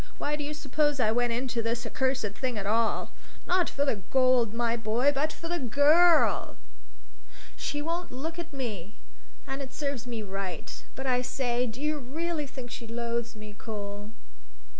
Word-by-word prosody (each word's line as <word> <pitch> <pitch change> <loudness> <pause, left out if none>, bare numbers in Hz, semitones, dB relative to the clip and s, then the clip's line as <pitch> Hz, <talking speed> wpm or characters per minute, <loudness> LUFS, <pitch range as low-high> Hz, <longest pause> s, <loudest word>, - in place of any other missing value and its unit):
Why 295 - 0
do 295 - -4
you 300 +1 -3
suppose 295 0 +1
I 220 -3 +4
went 240 +1 +2
into 240 0 0
this 230 +1 -1
accursed 260 -4 0
thing 245 +2 -2
at 200 - -2
all? 225 +2 +2 0.3
Not 360 -1 +3
for 280 - 0
the 270 - +1
gold, 255 -4 +4
my 230 0 +1
boy, 235 +5 +3
but 300 +3 +1
for 330 - -7
the 345 +1 -1
girl! 300 +7 +5 0.7
So - - -22 0.2
she 290 - -2
won't 340 +3 -2
look 320 +7 -4
at 340 -1 -5
me. 220 - -4 0.5
And 270 +1 -4
it 265 -1 -7
serves 280 -5 -2
me 230 -3 -3
right. 195 -4 -5
But 265 - -5
I 250 -1 +3
say 250 -1 0
do 230 +2 -6
you 300 +1 0
really 305 +3 -2
think 255 -3 -8
she 230 - -6
loathes 235 0 -2
me, 215 -1 -9
Cole?" 205 -1 -6
250 Hz, 180 wpm, -29 LUFS, 230-290 Hz, 0.7 s, girl